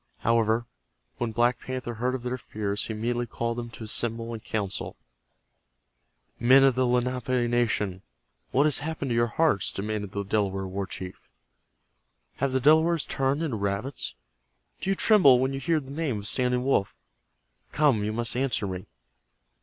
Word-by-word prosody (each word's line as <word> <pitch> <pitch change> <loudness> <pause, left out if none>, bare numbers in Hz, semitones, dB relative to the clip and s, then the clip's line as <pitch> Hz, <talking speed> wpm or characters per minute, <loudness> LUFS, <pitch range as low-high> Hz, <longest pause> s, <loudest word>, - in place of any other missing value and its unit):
However, 115 0 +2 0.5
when 120 -2 -2
Black 120 +2 +2
Panther 130 -2 -5
heard 125 +3 -1
of 125 - -6
their 125 +1 -3
fears 105 -2 -3
he 110 - -3
immediately 120 +2 -1
called 115 0 -3
them 120 0 -6
to 115 - -10
assemble 115 +1 -1
in 115 - -5
council. 105 -3 -4 1.4
"Men 130 +3 +6
of 135 -1 +5
the 130 +1 +1
Lenape 125 +2 0 0.2
nation, 110 -6 0 0.5
what 140 - +3
has 150 -3 +4
happened 150 -2 -4
to 120 - 0
your 120 0 +3
hearts?" 120 - +2
demanded 105 -1 -4
the 100 0 -3
Delaware 95 -1 0
war 95 +1 -4
chief. 95 -1 -8 1.1
"Have 140 0 0
the 130 - +1
Delawares 160 +3 +4
turned 135 +4 0
into 135 -9 -2
rabbits? 100 - -2 0.6
Do 190 - -3
you 195 - +2
tremble 185 - +6
when 130 +2 0
you 135 - -3
hear 160 +4 +1
the 135 -2 -10
name 145 -6 -2
of 100 0 -5
Standing 125 +1 0
Wolf? 115 -7 +1 0.8
Come, 135 -7 +3
you 105 - -1
must 115 +1 -1
answer 125 -4 0
me." 95 -1 -5
120 Hz, 165 wpm, -27 LUFS, 110-135 Hz, 1.4 s, Men